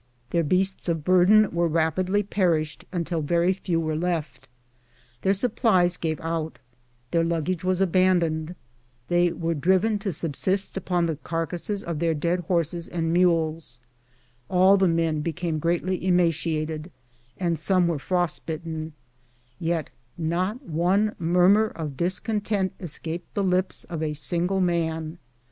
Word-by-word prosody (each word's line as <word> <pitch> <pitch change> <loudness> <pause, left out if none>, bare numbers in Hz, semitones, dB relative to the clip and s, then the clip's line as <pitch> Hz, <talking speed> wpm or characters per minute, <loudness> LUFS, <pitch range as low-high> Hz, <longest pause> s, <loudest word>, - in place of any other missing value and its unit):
Their 170 - +2
beasts 185 +4 0
of 165 -3 -1
burden 185 +5 +5
very 170 0 +1
rap 160 +1 0
idly 190 +3 +1
perished 170 -6 0
until 170 -2 -2
very 170 +4 +2
few 180 -3 -2
were 155 -1 -1
left; 165 -2 -3 0.7
their 195 +1 +2
supplies 190 -5 +2
gave 160 -3 -2
out; 165 -1 -3 0.5
their 165 -1 +2
luggage 170 +1 -1
was 185 0 +1
abandoned; 175 -3 +2 0.5
they 175 0 +3
were 165 0 -2
driven 190 +7 +2
to 200 -1 -2
subsist 180 +5 -1
upon 180 -2 0
the 160 -3 -2
carcasses 170 +6 -3
of 170 -3 -4
their 165 -1 +1
dead 170 +4 0
horses 170 -1 -1
and 165 -1 -2
mules; 165 -6 +1 0.7
all 185 +2 +5
the 190 -1 +3
men 165 -2 +1
became 165 0 -2
greatly 175 +3 -1
emaciated; 165 -3 0 0.6
some 175 +3 +2
were 165 -4 -1
frost 175 +1 -1
bitten, 160 -1 -5 0.7
yet 165 -2 -2 0.3
not 180 - -2
one 190 +5 +1
murmur 180 +6 +4
of 155 -8 -6
discontent 195 - -1
escaped 170 0 -5
the 200 - +1
lips 185 0 +1
of 165 -3 -6
a 155 -1 -1
single 175 +5 0
man. 165 -2 -1
170 Hz, 135 wpm, -25 LUFS, 160-185 Hz, 0.7 s, burden